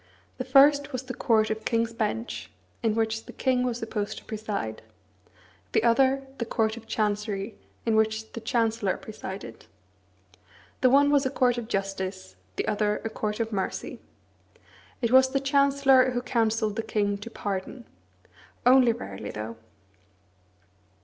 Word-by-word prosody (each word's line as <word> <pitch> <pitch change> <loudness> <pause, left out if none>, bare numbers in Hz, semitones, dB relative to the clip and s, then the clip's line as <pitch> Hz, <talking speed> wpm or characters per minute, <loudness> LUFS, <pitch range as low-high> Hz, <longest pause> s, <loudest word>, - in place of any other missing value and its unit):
The 255 - -2
first 285 +2 +5
was 255 0 -3
the 255 -1 -6
Court 220 -3 +2
of 220 0 -3
King's 230 -1 0
Bench, 225 +1 -3 0.3
in 225 -2 +1
which 225 0 -1
the - - -9
king 255 -2 +1
was 245 -2 -1
supposed 215 -2 -3
to - - -11
preside; 210 - -4 0.9
the - - +4
second, 265 +4 +3
the 235 - -1
Court 220 -1 0
of 230 -1 -12
Chancery, 210 -1 -1 0.3
in 225 -1 +2
which 220 0 +1
the 230 - -7
Chancellor 225 -3 0
presided. 195 -3 -8 1.1
The 255 - +5
one 285 +2 +5
was 280 -2 +3
a - - -1
court 245 -2 +2
of 230 - -7
justice, 195 - -3 0.2
the - - -2
other 210 0 +1
a - - -1
court 210 0 -3
of 225 0 -1
mercy. 195 -3 -3 1.0
It 235 - +1
was 260 0 +6
the 275 - +3
Chancellor 275 -1 +4
who 245 -1 -2
counselled 225 -3 0
the - - +1
king 205 -2 -1
to 210 - -8
pardon; 205 +3 -5 0.8
only 250 -2 +6
rarely, 95 - -7
though. 110 +2 -6
225 Hz, 150 wpm, -27 LUFS, 210-255 Hz, 1.1 s, was